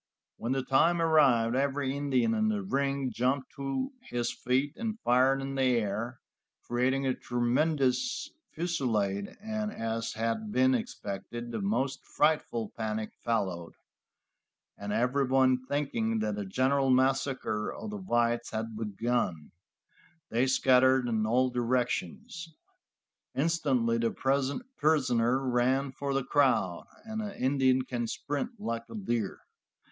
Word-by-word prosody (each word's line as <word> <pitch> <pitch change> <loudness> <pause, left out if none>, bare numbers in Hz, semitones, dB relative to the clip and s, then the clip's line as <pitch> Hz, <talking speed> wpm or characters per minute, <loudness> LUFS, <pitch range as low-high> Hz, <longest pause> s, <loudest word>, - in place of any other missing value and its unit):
When 120 +3 -2
the 135 -1 -1
time 165 +7 +3
arrived 135 -8 +4
every 140 0 0
Indian 140 - +1
in 220 -1 +2
the 210 -2 -1
ring 140 -6 -1
jumped 130 +2 0
to 140 - -2 0.2
his 120 -1 -1
feet 135 +4 0
and 225 -1 -4
fired 130 +2 +3
in 135 0 -4
the 135 - -1 0.2
air, 115 +3 -3 0.4
creating 130 +3 +1
a 130 - +2
tremendous 135 - 0 0.2
fusilade, 110 - -1
and 215 0 -3
as 115 - -3
had 115 - -2
been 260 +5 +4
expected, 120 - -4
the 115 -2 -3
most 125 +7 -1
frightful 120 -8 0
panic 110 -1 -3
followed, 95 -7 -1 1.0
and 100 0 -6
everyone 130 +1 +2
thinking 130 -6 -1
that 105 -1 -1
a 100 - -3
general 135 +6 +2
massacre 130 -4 +1
of 215 +1 -7
the 210 - -4
whites 120 -10 0
had 110 0 -4
begun, 105 -6 -2 0.8
they 120 +3 +2
scattered 130 0 +4
in 110 -2 0
all 125 +3 +2
directions. 150 - -2 0.8
Instantly 135 -7 +1
the 115 0 +2 0.7
prisoner 130 -4 +2
ran 130 +3 +1
for 140 +1 -3
the 135 - +1
crowd, 130 -11 +1 0.2
and 220 0 -4
an 210 -2 -5
Indian 130 -1 +2
can 120 -2 -3
sprint 205 - -4
like 115 - -3
a - - -8
deer. 120 - -2
130 Hz, 130 wpm, -30 LUFS, 115-145 Hz, 1.0 s, arrived